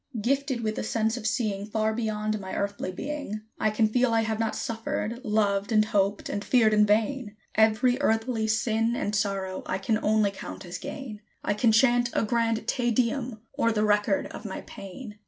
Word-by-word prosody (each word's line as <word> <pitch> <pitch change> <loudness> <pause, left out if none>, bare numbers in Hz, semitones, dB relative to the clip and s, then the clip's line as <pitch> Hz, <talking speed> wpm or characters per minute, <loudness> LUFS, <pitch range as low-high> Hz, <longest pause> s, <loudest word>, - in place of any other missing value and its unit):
Gifted 270 +2 0
with 215 0 -1
a - - -2
sense 220 +1 0
of 220 -3 -3
seeing 215 -3 -1
Far 220 0 0
beyond 215 -1 -1
my 190 -1 -6
earthly 200 -2 -2
being, 275 -1 -5 0.2
I 215 - +2
can 215 +1 +2
feel 245 +2 +2
I 225 - +4
have 220 0 -2
not 225 -1 0
suffered, 230 -1 -3
loved, 205 -2 +1
and 215 -1 +4
hoped, 205 -1 0
and 205 0 -3
feared 225 -3 +4
in 210 0 +5
vain; 215 +1 +1 0.2
Every 225 +4 +3
earthly 225 -2 +1
sin 225 +1 +1
and 210 - -2
sorrow 195 -2 -1
I 185 - -1
can 215 +3 0
only 215 -1 +3
count 195 -1 -8
as 175 +1 -6
gain: 270 -7 -7 0.2
I - - +1
can 225 +2 +3
chant 240 +1 +4
a - - +1
grand 230 0 0
"Te 245 -2 +1
Deum" 235 -1 0 0.2
o'er 230 -4 +3
the 215 -1 +1
record 210 +7 +2
of - - -8
my - - -5
pain. 210 +2 -10
220 Hz, 190 wpm, -27 LUFS, 210-235 Hz, 0.2 s, in